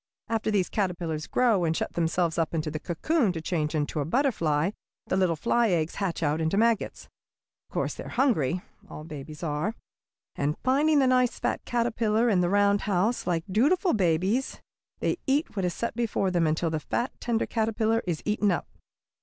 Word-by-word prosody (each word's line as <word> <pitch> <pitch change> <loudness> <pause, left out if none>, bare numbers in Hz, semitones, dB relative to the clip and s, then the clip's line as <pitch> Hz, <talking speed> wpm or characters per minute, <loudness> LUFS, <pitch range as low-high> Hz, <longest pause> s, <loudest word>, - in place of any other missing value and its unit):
After 225 -1 0
these 200 -4 +2
caterpillars 175 -6 -2
grow 230 -7 +2
and 160 -1 +1
shut - - -3
themselves 170 0 0
up 165 0 0
into 155 -1 -2
a 155 - -3
cocoon 215 - 0
to 165 - -4
change 160 -2 -2
into 150 0 -1
a - - +1
butterfly 165 - +1 0.3
the - - -1
little 185 -3 +2
fly 235 +7 +2
eggs 165 -3 0
hatch 180 -4 -1
out 150 +1 +1
into 160 +5 0
maggots. 230 0 +1 0.6
Of - - -26
course - - 0
they - - -8
are - - -7
hungry 185 - +1 0.3
all 150 - -8
babies 150 0 -9
are; 155 +8 -1 0.6
and 145 +2 -1
finding 290 +4 +3
the 275 - +4
nice, 255 -1 +3
fat - - -2
caterpillar 235 -1 +1
in 190 -5 +3
the 175 - +1
round 205 +1 +3
house, 205 +6 +1
like 165 -2 0
dutiful 300 - +2
babies 190 +6 +1 0.4
they - - 0
eat 280 +1 +1
what 195 -3 0
is 175 - -1
set 235 - -3
before 220 -5 0
them 170 -2 +2
until 160 +1 0
the 160 - -1
fat, 240 +10 -2
tender 230 -2 0
caterpillar 225 0 0
is 165 -4 -2
eaten 210 -1 +1
up. 175 - -1
190 Hz, 185 wpm, -27 LUFS, 165-230 Hz, 0.6 s, the